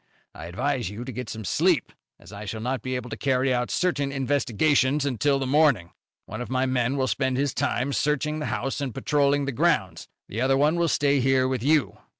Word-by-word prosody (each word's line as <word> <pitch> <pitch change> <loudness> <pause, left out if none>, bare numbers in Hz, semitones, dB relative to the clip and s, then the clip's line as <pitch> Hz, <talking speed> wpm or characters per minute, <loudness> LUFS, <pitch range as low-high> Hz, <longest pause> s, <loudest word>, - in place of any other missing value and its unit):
I 80 - -9
advise 120 +6 -2
you 110 +4 -7
to 130 - -5
get 125 0 -6
some 110 -2 -6
sleep, - - +1 0.3
as - - -14
I 100 +1 -7
shall 110 +2 -5
not 125 +4 -2
be 130 0 -3
able 125 -1 -5
to - - -3
carry 130 -1 +1
out 125 0 -1
certain 145 -6 0
investigations 135 +1 +1
until 140 +1 +1
the 135 - -2
morning. 130 - +2 0.3
One 110 +4 -7
of 120 - -6
my 130 0 +1
men 130 +1 0
will 130 - +1
spend 130 0 0
his 140 -1 0
time 135 +3 -1
searching 150 +2 0
the 150 - -3
house 135 +3 -3
and 130 -5 -4
patrolling 145 -1 +1
the 140 - -2
grounds, 140 - 0 0.2
the 110 - -4
other 135 +1 +3
one 150 +4 +3
will 170 0 +2
stay 140 -2 +2
here 130 0 +2
with 130 -3 -2
you." 145 +1 +1
130 Hz, 215 wpm, -25 LUFS, 125-145 Hz, 0.3 s, other